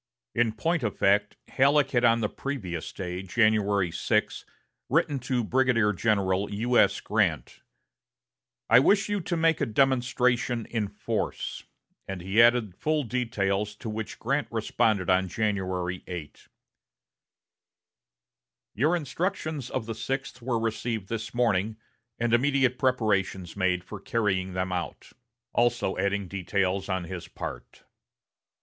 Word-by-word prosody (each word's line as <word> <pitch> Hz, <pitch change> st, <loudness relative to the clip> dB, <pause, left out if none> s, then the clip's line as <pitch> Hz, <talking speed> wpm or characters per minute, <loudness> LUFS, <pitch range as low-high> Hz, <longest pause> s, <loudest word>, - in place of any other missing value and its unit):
In 115 Hz, -2 st, +2 dB
point 165 Hz, +9 st, 0 dB
of 110 Hz, -4 st, -2 dB
fact, 100 Hz, +1 st, +2 dB
Halleck 140 Hz, +1 st, +3 dB
had 120 Hz, -2 st, +2 dB
on 115 Hz, -1 st, +4 dB
the 105 Hz, -, +1 dB
previous 100 Hz, -, -5 dB
day, 90 Hz, -1 st, -5 dB
January 100 Hz, -2 st, +2 dB
6, -, -, 0 dB, 0.4 s
written 140 Hz, -2 st, +2 dB
to 125 Hz, -1 st, -1 dB
Brigadier 115 Hz, -3 st, +2 dB
General 100 Hz, -1 st, +1 dB
U.S. 120 Hz, +4 st, +2 dB
Grant: -, -, 0 dB, 1.1 s
"I 115 Hz, -, +7 dB
wish 200 Hz, +9 st, +3 dB
you 205 Hz, -1 st, 0 dB
to 170 Hz, +1 st, -2 dB
make 165 Hz, -1 st, +2 dB
a -, -, +3 dB
demonstration 125 Hz, -1 st, +1 dB
in 110 Hz, -3 st, -2 dB
force": -, -, -4 dB, 0.4 s
and 95 Hz, -1 st, -5 dB
he 95 Hz, +6 st, +3 dB
added 120 Hz, -4 st, +4 dB
full 155 Hz, +4 st, 0 dB
details, 105 Hz, -4 st, -1 dB
to 110 Hz, 0 st, -6 dB
which 110 Hz, 0 st, -5 dB
Grant -, -, -1 dB
responded 100 Hz, -5 st, 0 dB
on 95 Hz, 0 st, +3 dB
January 95 Hz, -3 st, -2 dB
8: 85 Hz, -5 st, -8 dB, 2.3 s
"Your 155 Hz, +10 st, +2 dB
instructions 155 Hz, -, -3 dB
of 125 Hz, -4 st, -3 dB
the 115 Hz, -, -4 dB
sixth 135 Hz, +4 st, -4 dB
were 120 Hz, -1 st, -1 dB
received 115 Hz, -2 st, -2 dB
this 115 Hz, 0 st, -4 dB
morning, 110 Hz, -3 st, +1 dB, 0.4 s
and 120 Hz, 0 st, 0 dB
immediate 130 Hz, 0 st, +2 dB
preparations 100 Hz, -8 st, 0 dB
made 90 Hz, -2 st, +1 dB
for 105 Hz, +2 st, -8 dB
carrying 95 Hz, -3 st, -1 dB
them 95 Hz, 0 st, -2 dB
out"; 90 Hz, -3 st, -5 dB, 0.4 s
also 120 Hz, -4 st, +1 dB
adding 100 Hz, 0 st, 0 dB
details 95 Hz, +1 st, -1 dB
on 95 Hz, -1 st, -1 dB
his 85 Hz, -1 st, -7 dB
part. -, -, -8 dB
110 Hz, 130 wpm, -27 LUFS, 95-125 Hz, 2.3 s, I